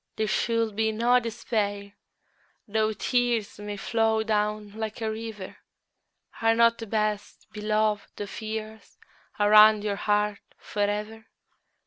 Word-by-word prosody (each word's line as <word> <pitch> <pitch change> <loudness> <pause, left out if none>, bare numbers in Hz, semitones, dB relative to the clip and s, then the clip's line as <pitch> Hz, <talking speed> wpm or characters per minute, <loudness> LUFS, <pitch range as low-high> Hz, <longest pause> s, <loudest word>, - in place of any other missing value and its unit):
There 220 - 0
should 230 0 0
be 220 +1 +1
no 240 +3 +3
despair 210 -3 -3 0.7
though 220 +1 +1
tears 235 -2 -1
May 205 0 -6
flow 225 +1 +1
down 210 -1 -1
like 220 +1 -5
a 220 -1 -2
river: 220 -3 -7 0.8
Are 225 0 +3
not 230 0 +4
the 225 - -6
best 210 -1 -2
beloved 215 0 -1
of 205 +1 -6
years 220 -1 -7 0.4
Around 210 0 +7
your 205 -1 -2
heart 210 0 0 0.2
for 205 - -5
ever? 210 +2 -2
215 Hz, 125 wpm, -26 LUFS, 210-225 Hz, 0.8 s, Around